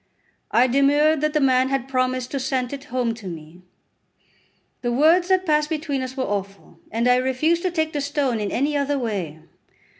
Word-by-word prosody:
I 245 - +4
demurred 285 +4 +3
that 305 0 0
the 305 - +2
man 260 -2 +3
had 270 -1 -1
promised 255 -1 -1
to 275 - -2
sent 260 -1 -2
it 280 0 -7
home 250 -4 -1
to 225 -4 -10
me. 165 0 -9 1.2
The 240 - -1
words 320 +8 +4
that 375 0 +2
passed 300 -2 +1
between 300 -4 -2
us 260 0 -6
were 260 - 0
awful, 200 -3 -5
and 230 +2 0
I 250 0 +5
refused 265 +7 +1
to 370 - 0
take 315 -2 -1
the 290 - -2
stone 280 -5 -1
in 205 -2 -3
any 290 +4 0
other 285 0 0
way. 200 - -3
265 Hz, 190 wpm, -22 LUFS, 245-300 Hz, 1.2 s, I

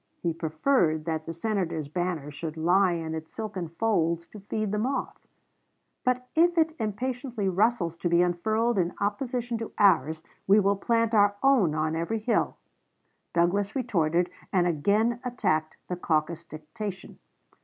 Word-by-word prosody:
He 170 -2 +1
preferred 160 - +1
that 160 -1 -3
the - - -2
Senator's 170 -4 -2
banner 165 -2 -3
should 155 +2 -6
lie 180 +3 +3
in 165 -1 -3
its 160 0 -6
silken 195 -6 -4
folds 170 -3 0
to 210 - -11
feed 210 +1 -3
the 210 - 0
moth; 260 +5 -3 0.8
"but 250 0 0
if 345 +2 +3
it 320 -1 +3
impatiently 240 0 -2
rustles 190 -3 +1
to 175 - -1
be 170 +1 +4
unfurled 215 +6 +1
in 175 -1 0
opposition 235 +3 -2
to 225 - -6
ours, 160 -5 +3 0.2
we 200 +2 +6
will 200 0 +3
plant 230 +2 +1
our 205 -1 +4
own 240 - +4
on 155 +1 0
every 170 +7 -1
hill." 220 +2 0 0.7
Douglas 195 +4 +1
retorted, 175 - +1 0.2
and 180 -3 +3
again 205 +9 +1
attacked 185 -11 -1
the 180 - -2
caucus 165 -1 -1
dictation. 185 +6 -7
190 Hz, 150 wpm, -27 LUFS, 165-225 Hz, 0.8 s, we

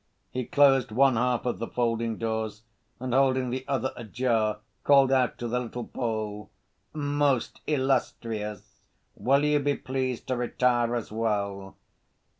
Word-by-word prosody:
He 125 -1 -3
closed 135 -3 +4
one 135 +3 +4
half 125 +1 +1
of 120 - -1
the 115 - -3
folding 115 -2 -1
doors, 110 -1 -3 0.4
and 125 -1 -3
holding 130 -1 +3
the 130 +1 -3
other 135 -1 0
ajar 115 -2 0 0.3
called 140 -2 +5
out 130 -2 +2
to 120 - -4
the 125 +2 0
little 120 0 -5
Pole: 110 -3 -4 0.4
"Most 145 -3 0
illustrious, 110 -7 -2 0.3
will 135 +7 +2
you 150 0 +3
be 145 0 +1
pleased 130 -2 -3
to 130 - +1
retire 120 -1 +1
as 115 -3 -4
well?" 100 -3 -2
125 Hz, 140 wpm, -27 LUFS, 110-130 Hz, 0.4 s, called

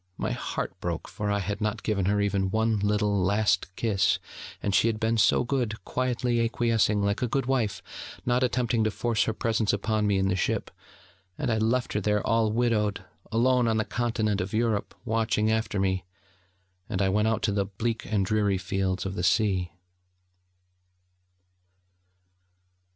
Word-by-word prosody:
My - - -2
heart - - -3
broke, 85 -3 -3
for 105 0 -4
I 100 - +1
had 100 +2 -3
not 105 -1 -2
given 100 -4 0
her 105 +2 +2
even 100 -2 +1
one 110 +1 +1
little, 105 -1 +1
last 100 0 +2
kiss, 105 -4 +2 0.4
and 100 - -2
she 110 - +4
had 110 -1 -1
been 115 +1 +1
so - - +4
good, 120 -4 -1
quietly 125 -2 0
acquiescing, 115 -3 +1
like 100 +4 0
a 125 - +1
good 135 +2 -1
wife, 115 -7 -1 0.4
not 125 +1 +2
attempting 125 -2 +1
to 110 - +2
force 110 0 0
her - - 0
presence 110 -1 0
upon 105 +1 0
me 100 -1 +2
in 95 0 +1
the 95 - +1
ship; 90 - -1 0.7
and - - -1
I 110 - +1
left 120 +3 0
her 105 - 0
there, 105 +1 0
all 115 -1 +2
widowed, 105 -4 0 0.3
alone 125 +2 +3
on 110 -1 +2
the 110 - 0
Continent 110 -4 -1
of 95 +3 -4
Europe, 110 -2 0
watching 110 -1 +1
after 110 -2 -1
me: 95 -1 0 0.9
and 100 -4 -2
I 100 - +2
went 105 +3 +2
out 110 0 0
to 105 - +2
the 100 -1 0
bleak 110 +4 -3
and 100 -3 +2
dreary 105 -2 +1
fields 95 0 -2
of 95 - -3
the 90 - -3
sea. 95 -3 +2
105 Hz, 175 wpm, -27 LUFS, 100-115 Hz, 0.9 s, she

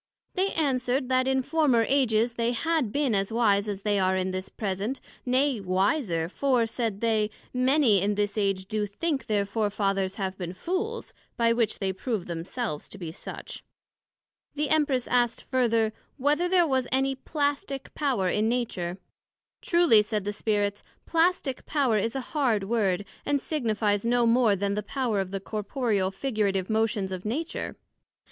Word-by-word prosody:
They 385 +1 +1
answered, 260 -3 0
That 255 0 +2
in 265 0 +2
former 280 -6 +3
Ages 240 -4 +2
they 235 +1 0
had 310 -2 0
been 280 -3 +1
as 195 +1 +1
wise 210 -3 +2
as 200 -1 -4
they 205 -1 +2
are 190 0 +2
in 185 0 -1
this 185 0 -4
present, 205 +5 -3 0.3
nay, 260 0 +2
wiser; 185 - +1
for, 250 +4 +1
said 225 -3 -3
they, 220 -2 +2 0.2
many 255 -5 +4
in 205 +1 +1
this 205 0 0
age 195 -3 0
do 210 +1 -1
think 285 +7 -2
their 205 -2 +1
Fore 210 +1 0
fathers 195 -2 0
have 190 -2 -4
been 175 -1 -4
Fools, 385 - -3 0.2
by 230 0 +3
which 230 -2 0
they 190 -1 -1
prove 210 -1 -3
themselves 170 - -4
to - - -10
be 170 -4 -6
such. - - -8 0.9
The 295 -1 -1
Empress 290 -5 +2
asked 240 -2 +1
further, 230 -4 +1 0.2
Whether 295 +6 +1
there 360 -2 +5
was 265 -4 0
any 270 +1 +1
Plastick 285 +1 -2
power 260 -11 0
in 210 +4 +1
Nature? 190 -8 -2 0.6
Truly, 340 - +5
said 210 -1 -2
the 205 +1 -2
Spirits, 205 -1 -1 0.2
Plastick 330 -5 +1
power 265 -8 +2
is 225 +5 -1
a 270 - -1
hard 245 -9 +2
word, 200 -3 0 0.2
& 290 - +1
signifies 220 -8 0
no 240 +1 +2
more 230 -3 +4
then 200 +1 -1
the 210 - -1
power 230 -1 -1
of 190 -1 -2
the 195 0 -3
corporeal, 210 -1 -1
figurative 200 -3 -1
motions 220 -3 0
of 185 -1 -5
Nature. 290 +10 -3
225 Hz, 165 wpm, -27 LUFS, 200-265 Hz, 0.9 s, there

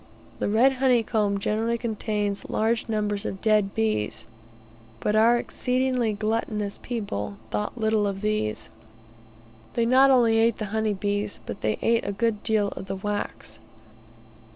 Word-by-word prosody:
The - - 0
red 240 +6 +4
honey 250 -3 +4
comb 205 -2 0
generally 225 +3 0
contains 210 -3 -2
large 225 +1 0
numbers 210 -1 -1
of 195 - -4
dead 210 -2 +2
bees, 105 -1 -1 0.7
but 210 - 0
our 230 +2 +5
exceedingly 250 -1 0
gluttonous 215 -1 -2
people 105 - -4
thought 105 - -2
little 220 -2 +1
of 195 -1 -4
these. 210 - -2 1.0
They 235 - +1
not 260 +3 +6
only 235 -4 +4
ate 230 0 +3
the 215 - -3
honey 220 -1 0
bees, 205 +1 -2
but - - -7
they 105 0 +1
also - - -8
ate 230 0 +2
a - - 0
good 220 0 0
deal 215 -3 +1
of 190 - -8
the 195 - -3
wax. 205 - -4
215 Hz, 155 wpm, -25 LUFS, 200-230 Hz, 1.0 s, not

